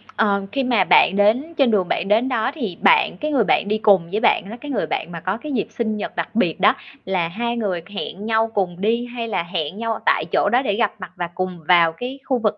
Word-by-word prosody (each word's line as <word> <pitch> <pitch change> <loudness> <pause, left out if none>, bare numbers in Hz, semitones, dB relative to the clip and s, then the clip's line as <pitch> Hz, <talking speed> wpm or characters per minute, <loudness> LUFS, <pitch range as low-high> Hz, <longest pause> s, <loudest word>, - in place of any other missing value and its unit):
ờ, 200 -2 +1
khi 275 - -1
mà 240 -6 +3
bạn 185 - +5
đến 225 +11 +2
trên 270 -4 +3
đường 195 -4 +1
bạn 195 - -1
đến 225 +5 +2
đó 245 0 0
thì 220 - -5
bạn - - +4
cái 305 +10 -3
người 265 -6 +3
bạn 200 - +1
đi 215 - +1
cùng 200 -6 +3
với 210 - 0
bạn 235 - +3
á, 230 - -7
cái 295 -1 -6
người 205 -9 -1
bạn 170 - -3
mà 170 - -6
có 185 +3 -2
cái 300 +5 -7
dịp 230 -5 -1
sinh 220 -1 -3
nhật 210 - -5
đặc - - -4
biệt 175 -7 +1
đó, 190 - +4 0.3
là 185 -3 0
hai 235 +7 -3
người 195 -6 -2
hẹn 205 0 -6
nhau 225 0 +1
cùng 185 -3 -2
đi 230 +4 +1
hay 240 -1 -5
là 205 -6 -1
hẹn 170 0 -4
nhau 225 0 -2
tại - - +2
chỗ - - +2
đó 245 +2 +4
để 205 -7 -1
gặp 230 - +1
mặt 185 -2 -8
và 175 -1 -3
cùng 185 -1 -3
vào 170 -2 +5
cái 250 +9 -6
khu 260 -3 0
vực 215 -2 0
215 Hz, 265 wpm, -21 LUFS, 185-235 Hz, 0.3 s, bạn